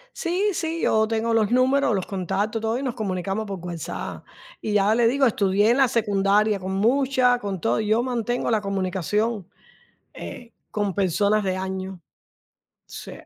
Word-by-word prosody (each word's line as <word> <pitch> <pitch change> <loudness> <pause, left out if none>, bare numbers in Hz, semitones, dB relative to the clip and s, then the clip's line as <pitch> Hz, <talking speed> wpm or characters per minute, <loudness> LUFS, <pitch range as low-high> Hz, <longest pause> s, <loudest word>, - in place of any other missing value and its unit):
Sí, 375 +4 0
sí, 330 -1 -3
yo 220 0 +3
tengo 225 +1 0
los 220 -2 +2
números, 255 -1 +3
los 190 - -2
contactos, 200 +3 -2
todo, 225 +1 0
y 265 - -4
nos 255 -3 -2
comunicamos 195 -1 -2
por 195 -2 -5
WhatsApp. 170 -2 -6 0.3
Y 215 - -3
ya 205 +1 +3
le 235 0 +3
digo, 270 +3 +3
estudié 205 -2 +2
en 245 - +2
la 270 -1 +5
secundaria 210 -2 +2
con 190 0 -4
muchas, 250 +3 +2
con 195 -5 -4
todo, 120 -2 +1
y 215 - -2
yo 220 +3 +2
mantengo 240 -1 -1
la 220 - +3
comunicación, 195 +2 -1 0.7
eh, 240 -1 -9 0.2
con 205 -2 -1
personas 200 +3 +1
de 185 -1 0
años. 190 0 -4 0.9
Sí. - - -9
215 Hz, 165 wpm, -24 LUFS, 195-240 Hz, 0.9 s, la